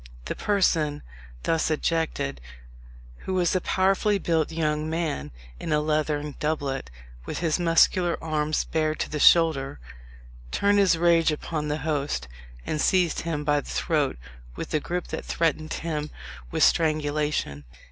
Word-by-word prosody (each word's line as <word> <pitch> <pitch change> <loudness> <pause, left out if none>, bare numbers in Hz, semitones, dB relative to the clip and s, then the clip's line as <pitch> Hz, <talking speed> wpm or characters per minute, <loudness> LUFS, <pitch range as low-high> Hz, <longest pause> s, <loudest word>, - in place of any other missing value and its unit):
The - - -2
person 165 -7 +1 0.4
thus 165 -1 +1
ejected, 155 - -1 0.8
who 190 - -4
was 180 0 +2
a 185 - +1
powerfully 195 +3 +2
built 165 -4 0
young 155 -1 -1
man, 160 - -2 0.3
in - - -4
a 150 - +3
leathern 150 -1 -1
doublet, 140 - -2 0.4
with - - -4
his 165 0 0
muscular 175 +1 +3
arms 155 -1 0
bared 155 -1 -1
to - - -3
the 150 - -2
shoulder, 145 - +4 0.7
turned 205 - +2
his 190 -4 +4
rage 165 -1 +4
upon 150 0 -3
the 150 0 -1
host, 145 - -1 0.4
and 155 - -1
seized 180 -3 +2
him 160 -3 -3
by 145 -1 +2
the - - -12
throat 150 -5 0 0.4
with - - -6
a 155 - +3
grip 175 +4 -3
that - - -4
threatened 155 -1 -1
him 155 -2 -3 0.4
with - - +1
strangulation. 150 - +1
155 Hz, 145 wpm, -26 LUFS, 150-170 Hz, 0.8 s, shoulder